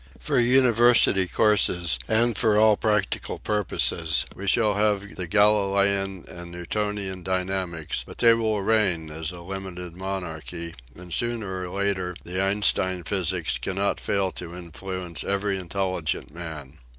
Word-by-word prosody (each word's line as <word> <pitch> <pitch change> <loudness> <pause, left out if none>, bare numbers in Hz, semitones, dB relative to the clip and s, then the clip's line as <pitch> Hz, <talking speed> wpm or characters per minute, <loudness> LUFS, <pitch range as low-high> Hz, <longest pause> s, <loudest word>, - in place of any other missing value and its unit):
For 140 -4 +1
uni 125 +1 +4
versity 115 -5 +4
courses 90 - +2
and 115 +1 +2
for 110 0 +3
all 110 0 +6
practical 105 -2 0
purposes 85 -6 +1
we 100 - -7
shall 105 +1 +3
have 105 0 0
the 90 -2 -4
Galilean 100 -1 +2
and 85 0 -9
Newtonian 95 +1 -3
dynamics 90 -3 -2
but - - -11
they 115 -1 +6
will 110 -3 0
reign 95 -8 +2
as 80 0 -4
a 90 -1 -9
limited 90 -1 -6
monarchy 85 -3 -5 0.2
and 90 -1 -10
sooner 105 -6 -2
or - - -8
later 95 -2 -1
the 90 +2 -2
Einstein 95 -2 +1
physics 90 -2 0
cannot 100 +1 -1
fail 95 -2 0
to 90 -1 -8
influence 90 0 -6
every 100 0 0
in 90 -2 -9
telligent 95 -6 -2
man. 80 -5 -8
95 Hz, 140 wpm, -25 LUFS, 90-105 Hz, 0.2 s, all